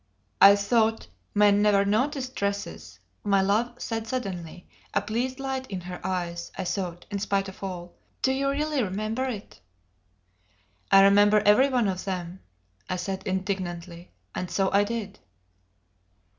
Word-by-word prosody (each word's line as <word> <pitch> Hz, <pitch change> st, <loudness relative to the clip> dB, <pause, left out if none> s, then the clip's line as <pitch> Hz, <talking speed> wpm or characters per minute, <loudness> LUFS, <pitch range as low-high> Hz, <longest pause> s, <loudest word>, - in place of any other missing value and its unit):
"I 200 Hz, +1 st, +10 dB
thought 220 Hz, +2 st, +1 dB, 0.3 s
men 205 Hz, 0 st, +5 dB
never 205 Hz, -1 st, +4 dB
noticed 255 Hz, +5 st, 0 dB
dresses?" 200 Hz, 0 st, -4 dB, 0.3 s
my 200 Hz, -1 st, +3 dB
love 235 Hz, +5 st, 0 dB
said 225 Hz, -1 st, -4 dB
suddenly, 180 Hz, -8 st, -5 dB, 0.3 s
a -, -, +3 dB
pleased 250 Hz, +4 st, -2 dB
light 265 Hz, -1 st, -3 dB
in 190 Hz, -5 st, -5 dB
her 180 Hz, 0 st, -8 dB
eyes 175 Hz, -2 st, -3 dB
(I 190 Hz, -, -2 dB
thought) 175 Hz, -2 st, -3 dB
in 200 Hz, -, -2 dB
spite 195 Hz, -1 st, 0 dB
of 190 Hz, +1 st, -10 dB
all. 175 Hz, -2 st, -6 dB, 0.3 s
"Do 265 Hz, -, +3 dB
you 275 Hz, +1 st, 0 dB
really 295 Hz, 0 st, 0 dB
remember 215 Hz, +5 st, -2 dB
it?" 220 Hz, -, -6 dB, 1.3 s
"I 195 Hz, 0 st, +8 dB
remember 205 Hz, +1 st, +6 dB
every 210 Hz, +7 st, +6 dB
one 245 Hz, -5 st, +2 dB
of 185 Hz, -1 st, -3 dB
them," 180 Hz, -1 st, -4 dB, 0.5 s
I 185 Hz, -, 0 dB
said 190 Hz, +1 st, -4 dB
indignantly; 185 Hz, -2 st, -4 dB, 0.2 s
and 180 Hz, -, -4 dB
so 195 Hz, -1 st, +1 dB
I 200 Hz, +1 st, +4 dB
did. 210 Hz, -2 st, -5 dB
200 Hz, 145 wpm, -26 LUFS, 185-230 Hz, 1.3 s, I